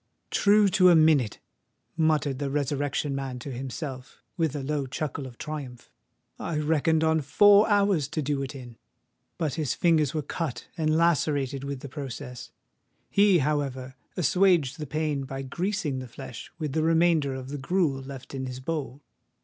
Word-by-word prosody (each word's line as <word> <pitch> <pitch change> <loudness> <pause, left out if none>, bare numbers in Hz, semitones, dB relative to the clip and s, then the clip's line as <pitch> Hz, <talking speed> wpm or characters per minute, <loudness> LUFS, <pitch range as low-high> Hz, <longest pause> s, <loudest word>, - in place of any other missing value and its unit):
"True 205 0 +5
to 185 -1 +5
a 175 - +7
minute!" 155 -8 +4 0.6
muttered 155 -4 +1
the 140 -1 -2
Resurrection 145 0 -1
Man 135 -2 -4
to 130 +3 -7
himself, 130 +1 -7
with 160 -5 0
a 140 - -3
low 145 -1 -2
chuckle 140 0 -4
of 120 -2 -13
triumph: 140 -5 -7 0.5
"I 160 - -3
reckoned 160 +1 +2
on 160 0 +3
four 205 +9 +6
hours 200 -8 +3
to 155 - -3
do 140 0 -1
it 135 +1 -5
in!" 120 -3 -10 0.6
But 155 -5 -1
his 155 -6 -1
fingers 160 -4 +2
were 155 - -1
cut 150 -1 -4
and 155 -2 +1
lacerated 145 -4 +1
with 140 -2 -5
the - - -7
process: 125 -3 -7 0.6
he, 200 -2 +5
however, 135 -3 -2 0.2
assuaged 175 -5 +3
the 150 - -5
pain 150 -1 -1
by 135 +1 -5
greasing 165 -1 -2
the 130 - -7
flesh 120 0 -9
with 155 -4 -3
the 160 - +1
remainder 160 -3 +3
of 130 0 -7
the 145 0 -5
gruel 145 -2 0
left 135 -1 -9
in 130 -1 -4
his 125 0 -6
bowl. 145 -1 -4
145 Hz, 165 wpm, -27 LUFS, 135-160 Hz, 0.6 s, a